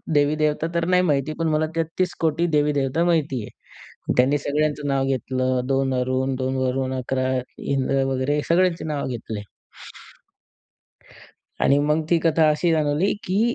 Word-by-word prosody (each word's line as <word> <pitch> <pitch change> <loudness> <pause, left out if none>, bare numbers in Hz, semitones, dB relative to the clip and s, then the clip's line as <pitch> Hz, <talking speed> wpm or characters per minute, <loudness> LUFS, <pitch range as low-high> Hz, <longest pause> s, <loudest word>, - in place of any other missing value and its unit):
देवी-देवता 150 +2 +1
तर 170 -1 +1
नाही 180 0 +4
माहिती, 150 -2 0
पण 165 - +1
मला 155 0 +1
33कोटी 165 0 -1
देवी-देवता 145 +1 +1
माहिती 155 -7 +1
आहे." - - -15 0.4
त्यांनी 135 +4 +3
सगळ्यांचं 145 0 -1
नाव 135 -1 +1
घेतलं 130 0 -1
2 135 -1 +1
अरुण, 130 +1 0
2 130 0 -2
वरुण, 130 0 -1
11 130 0 -1 0.3
इंद्र 135 0 0
वगैरे 135 +3 0
सगळ्यांचे 175 0 +2
नाव 150 -2 -2
घेतले. 110 -4 -5 2.2
आणि 140 - +4
मग 155 +1 +1
ती 170 - +4
कथा 160 -1 +4
अशी 150 +3 +1
जाणवली 155 +4 +1
की 220 +6 +1
145 Hz, 135 wpm, -23 LUFS, 130-160 Hz, 2.2 s, नाही